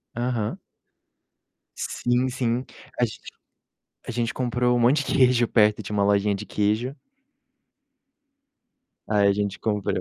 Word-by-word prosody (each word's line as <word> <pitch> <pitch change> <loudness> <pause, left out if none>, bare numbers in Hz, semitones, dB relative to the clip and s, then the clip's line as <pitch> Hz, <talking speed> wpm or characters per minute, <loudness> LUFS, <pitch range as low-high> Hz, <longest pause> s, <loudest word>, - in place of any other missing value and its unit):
Aham. 120 -3 -2 1.2
Sim, 125 +1 0
sim. 125 0 -1 0.3
A 120 - +4
gente 110 0 -9 0.9
a - - -6
gente 120 0 -2
comprou 125 0 0
um 120 - +1
monte 135 +5 +3
de - - -2
queijo 125 -3 +4
perto, 105 -1 +3
tinha 105 +2 -5
uma 100 - +2
lojinha 100 0 +2
de 100 +2 -4
queijo 110 +7 -1 2.1
Aí 100 -1 +3
a 100 - +4
gente 100 -1 -2
comprou, 105 -3 -1
115 Hz, 130 wpm, -24 LUFS, 105-125 Hz, 2.1 s, A